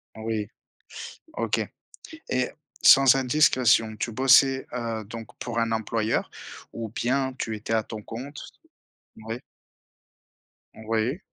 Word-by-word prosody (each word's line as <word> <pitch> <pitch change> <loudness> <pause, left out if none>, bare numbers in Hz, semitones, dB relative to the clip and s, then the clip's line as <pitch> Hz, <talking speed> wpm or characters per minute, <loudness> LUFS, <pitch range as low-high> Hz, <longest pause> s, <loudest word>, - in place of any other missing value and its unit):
Oui, 110 -1 -3 0.9
OK. - - 0 0.7
Et 130 -1 +1 0.3
sans 135 -1 +8
indiscrétion, 125 -5 +3
tu 115 +2 -3
bossais, 135 +2 +5
heu, 115 -3 -3
donc 115 +2 -8
pour 120 -1 -4
un 115 -1 +1
employeur 110 0 -1 0.4
ou 115 -1 -5
bien 130 +4 0
tu 110 -1 -3
étais 110 +1 -5
à 110 -1 +2
ton 110 -1 -8
compte? 130 +7 -8 0.8
Oui. - - -6 1.4
Oui. 115 - -1
115 Hz, 110 wpm, -26 LUFS, 110-130 Hz, 1.4 s, sans